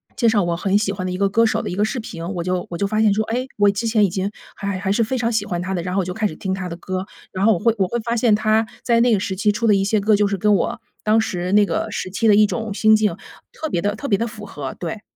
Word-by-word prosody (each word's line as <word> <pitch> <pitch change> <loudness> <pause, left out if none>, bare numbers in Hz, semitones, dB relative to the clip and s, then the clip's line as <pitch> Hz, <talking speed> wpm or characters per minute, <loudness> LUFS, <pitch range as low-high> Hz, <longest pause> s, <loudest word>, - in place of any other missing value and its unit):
介 235 - +2
绍 215 -2 +3
我 170 -1 -1
很 195 +2 0
喜 210 -2 0
欢 185 -1 -5
的 - - -3
一 180 - -3
个 200 0 +2
歌 230 +3 +3
手 - - +1
的 - - -4
一 180 - -4
个 205 +2 +2
视 235 +3 -3
频， 170 -6 -7
我 170 - -2
就 180 0 -1
我 170 - -3
就 200 - +1
发 215 +1 0
现 210 - +4
说， 220 +2 +1
哎， 245 +4 -2
我 205 - +5
之 210 +4 -3
前 220 -2 +3
已 - - 0
经 190 +3 -2 0.2
还 200 - -6
还 185 -2 -2
还 195 0 -1
是 225 +3 +2
非 260 +4 -2
常 235 0 0
喜 210 -2 0
欢 175 -3 -3
他 190 +1 -3
的， 170 - -2
然 180 0 -4
后 - - +2
我 - - -4
就 180 - -4
开 220 - -1
始 155 - -8
听 190 +2 -4
他 190 -1 -4
的 170 - -5
歌。 185 +1 -4 0.3
然 190 +2 -1
后 225 - +6
我 170 - -2
会 230 0 +2
我 190 -2 +1
会 240 +5 -2
发 235 +1 -2
现 230 -2 +3
他 215 +1 +2 0.2
在 235 -1 +3
那 240 -1 +4
个 205 - +2
时 190 -1 -3
期 210 +2 +2
出 230 +2 -1
的 210 - +5
一 195 - +1
些 210 +1 +1
歌， 210 +1 +3
就 205 0 +2
是 200 - -1
跟 210 +2 +3
我 230 +3 -1 0.2
当 220 +1 +3
时 180 -3 -3
那 210 - +6
个 - - -2
时 185 - -4
期 220 +4 0
的 210 - +6
一 210 0 +5
种 220 -1 -3
心 215 +1 +5
境 210 -5 +1 0.4
特 315 - -5
别 175 - -1
地 205 +1 0
特 280 +5 -6
别 200 - +2
地 230 - -1
符 215 -2 -10
合， 140 -8 -6
对。 180 +5 -5
205 Hz, 365 characters per minute, -21 LUFS, 190-220 Hz, 0.4 s, 后